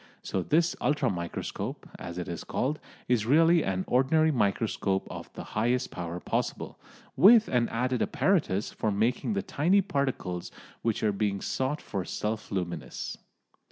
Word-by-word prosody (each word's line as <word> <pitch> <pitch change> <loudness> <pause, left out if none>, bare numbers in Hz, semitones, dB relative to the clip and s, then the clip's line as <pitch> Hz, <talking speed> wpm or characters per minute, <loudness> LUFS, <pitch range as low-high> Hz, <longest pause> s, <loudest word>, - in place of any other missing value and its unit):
So 95 - -1
this 165 - +2
ultra 145 -3 +2
microscope, 85 -2 -5
as 85 +1 -7
it 90 - -4
is 85 -2 -5
called, 145 +4 -1 0.3
is 115 -3 +1
really 165 +4 +5
an 95 -1 -1
ordinary 155 +5 +3
microscope 100 -4 0
of - - -8
the - - -7
highest 120 +4 0
power 85 0 -5
possible, - - -3 0.4
with 215 - +7
an 120 -2 +2
added 125 +2 0
apparatus 145 - +1
for 110 - -1
making 115 - 0
the 200 0 -1
tiny 180 +8 +3
particles 135 - -2 0.3
which 115 -1 -1
are 105 - +3
being 100 -1 0
sought 130 +8 -2
for 95 - -3
self 105 +3 -3
luminous. 90 -3 -4
120 Hz, 150 wpm, -28 LUFS, 95-150 Hz, 0.4 s, with